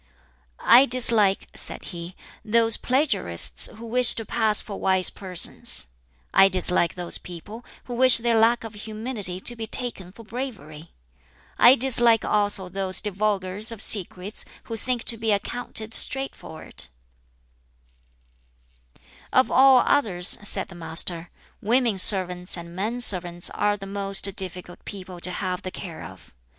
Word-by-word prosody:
"I 255 +4 +5
dislike," 230 -5 +2
said - - -9
he, 175 +1 -9 0.3
"those 225 +1 +2
plagiarists 255 - -1
who 225 +2 -11
wish 245 +1 +3
to 225 - -6
pass 215 -2 +1
for 200 - -5
wise 190 -1 +2
persons. 180 - -2 0.5
I 195 - +5
dislike 180 -2 +1
those 175 -1 -3
people 205 +7 -11 0.2
who 245 - -9
wish 255 +1 +5
their 235 0 0
lack 230 +2 +2
of 225 -1 -9
humility 215 -3 -2
to 240 - -2
be 225 -1 -7
taken 220 -7 -5
for 230 +4 -15
bravery. 205 - -8 0.7
I 245 +2 +7
dislike 240 -3 +2
also 205 -3 0
those 185 0 0
divulgers 205 +1 -2
of 230 - -9
secrets 200 -1 0 0.2
who 225 - -7
think 245 +1 -3
to 230 - +3
be 220 0 -1
accounted 220 +1 -3
straightforward." 270 -13 -1 2.5
"Of 260 - +2
all 265 -1 +5
others," 185 -9 +1
said 205 - +1
the - - -12
Master, 170 0 -2 0.3
"women 230 -2 +1
servants 180 -2 +4
and 170 0 -11
men 220 +6 -3
servants 175 -5 +3
are 205 0 -1
the 195 - -9
most 195 0 0
difficult 180 -1 -6
people 185 -3 -10
to 180 - -2
have 180 0 -4
the 185 - -6
care 175 -3 -9
of. 90 -7 -14
205 Hz, 140 wpm, -23 LUFS, 180-230 Hz, 2.5 s, I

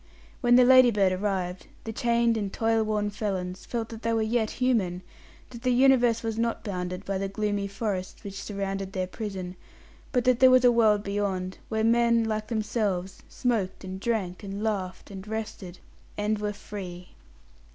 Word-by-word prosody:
When 245 -2 +5
the 250 - +7
Ladybird 240 -7 +6
arrived, 185 -1 -2 0.2
the 225 - -5
chained 235 0 +2
and 205 -3 -2
toil 225 +1 +1
worn 210 -1 0
felons 190 -3 -4
felt 230 -2 -3
that 225 -1 -8
they 230 0 0
were 225 -1 +1
yet 220 0 +1
human, 205 -9 0 0.5
that 235 -2 -9
the 255 - 0
universe 245 -2 +4
was 225 0 -2
not 230 0 -1
bounded 180 -2 -4
by 195 -1 -2
the 195 - -1
gloomy 205 0 -1
forests 195 -2 -4
which 195 -1 -6
surrounded 195 -1 -4
their 185 -1 -1
prison, 185 -2 -6 0.6
but 250 -3 +1
that 250 -1 +3
there 260 - +8
was 255 0 +5
a 245 - +7
world 215 -3 +4
beyond, 195 -2 -2
where 220 -1 0
men, 235 0 +4
like 215 -1 -2
themselves, 210 -4 -2
smoked, 220 -8 -1
and 190 0 -6
drank, 195 -5 -2
and 200 +1 -5
laughed, 190 -4 -3
and 195 +1 -8
rested, 210 -4 -5 0.4
and 210 +1 0
were 210 0 -1
Free. 185 -3 -8
210 Hz, 170 wpm, -27 LUFS, 190-230 Hz, 0.6 s, there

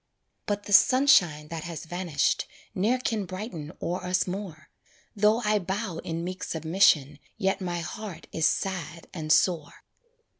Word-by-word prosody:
But 205 0 -1
the 205 - -4
sunshine 180 - +5
that 165 -2 -5
has 170 -1 -6
vanished 175 -4 0 0.3
Ne'er 215 +7 +2
can 225 -5 -2
brighten 185 -5 -6
o'er 175 +2 -2
us 180 +1 +1
more, 180 -6 -6 0.4
Though 215 +3 +3
I 210 0 +3
bow 190 -2 -3
in 165 0 -4
meek 185 +1 -5
submission 160 -3 +2 0.2
Yet 195 -2 0
my 175 -2 -2
heart 180 0 -7
is 160 - +2
sad 170 -3 -3
and 155 -3 -3
sore. 165 -3 +2
180 Hz, 145 wpm, -27 LUFS, 160-205 Hz, 0.4 s, sunshine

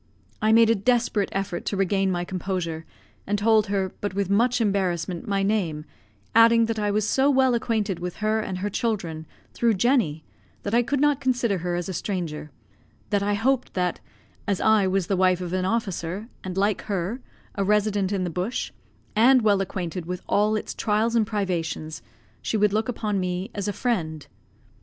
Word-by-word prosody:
I 215 - +3
made 225 0 +6
a - - +6
desperate 230 -1 +1
effort 195 -3 -3
to 200 - -1
regain 195 0 +1
my 175 -1 -1
composure, 175 -3 -3 0.4
and 205 +1 +1
told 215 0 +3
her, 195 -2 -1
but 205 -2 -3
with 200 -1 -1
much 240 +5 +3
embarrassment, 185 -5 -1
my 200 -1 0
name; 180 -8 -1 0.5
adding 230 0 +6
that 225 -1 -2
I 210 -1 0
was 210 +1 +1
so 270 +4 +3
well 260 -2 +4
acquainted 220 -5 -1
with 180 0 -5
her 215 +1 0
and 195 -4 -3
her 200 +3 -2
children, 175 -9 -2 0.3
through 230 -2 +2
Jenny, 190 - +1 0.4
that 200 - -3
I 240 - +5
could 275 +4 -1
not 290 -1 +2
consider 240 -7 +1
her 175 +1 -2
as 175 -1 -3
a 190 - -4
stranger; 165 -5 -4 0.6
that 205 -1 +2
I 205 +1 +1
hoped 255 +4 0
that, 180 -2 0 0.5
as 200 -2 0
I 215 -3 +4
was 190 -1 +1
the 195 - 0
wife 185 -1 +3
of 180 -1 -5
an 185 0 0
officer, 195 -1 -2
and 185 0 -5
like 200 0 +1
her, 200 +5 -2 0.3
a 200 - -1
resident 205 -1 +1
in 195 -2 0
the 175 - -2
bush, 180 +8 -3 0.4
and 245 +3 +5
well 205 -2 +3
acquainted 180 -2 -4
with 180 0 -5
all 210 +1 +2
its 215 - -3
trials 220 +2 0
and 220 -3 +3
privations, 170 - -3 0.4
she 220 - -1
would 210 -1 +2
look 220 +2 0
upon 210 -4 -1
me 185 +4 -3
as 200 -1 -3
a - - +1
friend. 165 - -2
200 Hz, 190 wpm, -25 LUFS, 180-220 Hz, 0.6 s, made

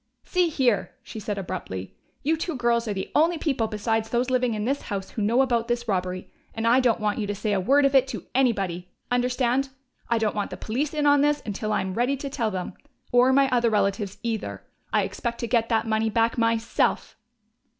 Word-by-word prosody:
"See 360 -2 +1
here!" 250 - +1
she 220 - -8
said 210 -1 -4
abruptly. 175 - -5 0.3
"You 310 +3 +2
two 325 0 -3
girls 235 -1 +1
are 210 - -1
the 190 - -4
only 330 +3 +3
people 270 -8 0
besides 220 +1 -1
those 245 +2 0
living 250 -3 +1
in 210 0 -2
this 275 +3 0
house 195 -2 -5
who 220 - -4
know 235 +6 +3
about 235 -3 0
this 240 0 -2
robbery, 185 -2 -2 0.2
and 225 0 -2
I 240 +3 +5
don't 240 -3 +2
want 210 0 -1
you 210 - -2
to 205 - -2
say 205 +1 -1
a 195 - +2
word 275 +9 +4
of 275 - +2
it 265 -1 +5
to 265 - -6
anybody! 195 -9 0 0.2
Understand? 250 +2 +1 0.4
I 235 - +2
don't 220 -2 0
want 205 -1 -2
the - - -7
police 275 +8 -2
in 300 -1 0
on 285 -1 +5
this 295 0 +2
until 215 +1 -3
I - - +1
am 190 0 -3
ready 250 +6 +1
to 275 +1 -6
tell 235 -5 -1
them. 185 -3 -4 0.4
Or 245 +1 +5
my 275 +1 +4
other 240 -2 +3
relatives, 200 -1 0
either. 225 -2 -3 0.3
I - - +3
expect 235 -1 -4
to 235 - -2
get 230 -1 +1
that 225 -1 +2
money 220 0 +1
back 225 +1 +1
myself!" 230 -1 0
230 Hz, 220 wpm, -25 LUFS, 210-260 Hz, 0.4 s, I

